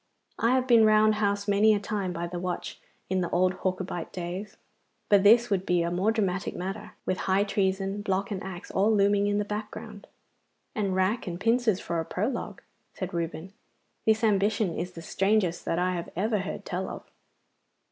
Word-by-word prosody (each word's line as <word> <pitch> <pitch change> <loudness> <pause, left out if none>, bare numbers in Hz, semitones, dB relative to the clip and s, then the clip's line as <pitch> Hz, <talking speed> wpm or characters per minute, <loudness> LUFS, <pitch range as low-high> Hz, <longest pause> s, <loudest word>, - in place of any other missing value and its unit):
I 230 +2 +3
have 255 -1 +1
been 235 -3 +6
round 215 0 +5
housed 200 0 0
many 210 +2 +5
a - - 0
time 200 -2 -3
by 170 0 -3
the 175 +1 -5
watch 180 0 -4 0.3
in 190 0 0
the 175 - -1
old 185 +1 +2
Hawkubite 185 -2 -3
days; 180 +3 -6 0.5
but 205 -2 +6
this 230 +3 +5
would 190 -2 +1
be 180 -2 +1
a 170 - -1
more 190 +5 +2
dramatic 195 -3 -1
matter, 195 +3 -5
with 185 - -1
high 190 +2 +4
treason, 195 0 -1
block, 195 0 -1
and 195 -2 -3
axe 185 -1 -7
all 200 +3 +3
looming 205 -1 +3
in 205 0 +1
the 210 - 0
background.' 215 0 -7 0.7
'And 200 -5 -1
rack 190 +4 0
and 175 -1 -4
pincers 230 -2 +2
for 170 - -3
a 165 - -2
prologue,' 230 +9 -3 0.3
said 185 0 -5
Reuben. 170 +2 -4 0.5
'This 220 +1 +3
ambition 205 -3 +2
is 180 +2 -4
the 165 - -9
strangest 195 -1 +1
that 165 - 0
I 180 +1 +1
have 170 -1 -4
ever 210 +4 0
heard 185 - -5
tell 185 +1 -3
of. - - -7
195 Hz, 190 wpm, -27 LUFS, 180-215 Hz, 0.7 s, been